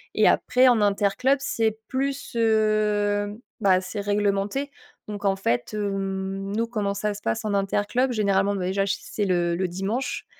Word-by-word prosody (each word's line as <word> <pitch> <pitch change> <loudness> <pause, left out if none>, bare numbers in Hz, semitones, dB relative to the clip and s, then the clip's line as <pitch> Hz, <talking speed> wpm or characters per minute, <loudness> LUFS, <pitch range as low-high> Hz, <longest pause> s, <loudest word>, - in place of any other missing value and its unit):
Et - - +5
après, 255 +1 +3
en 240 -2 +4
interclub, 205 +6 +2
c'est 225 -5 0
plus, 275 +1 -2
heu, 210 -2 +1 0.2
bah, 190 -3 +4
c'est 185 +3 -6
réglementé. 205 +6 0 0.4
Donc, 205 -1 -6
en 195 -1 +3
fait, 120 - -1
hem, 195 -1 -3
nous, 230 +1 0
comment 210 -4 -2
ça 210 +1 -2
se 205 - -10
passe 225 +2 -2
en 210 -1 -1
interclub? 205 +6 0
Généralement, 200 -2 +1
bah 185 -2 -2
déjà, 195 +1 +1
c'est 205 +1 -2
le 175 -2 +1
le 185 +1 0
dimanche, 195 +9 -3
205 Hz, 160 wpm, -24 LUFS, 195-220 Hz, 0.4 s, Et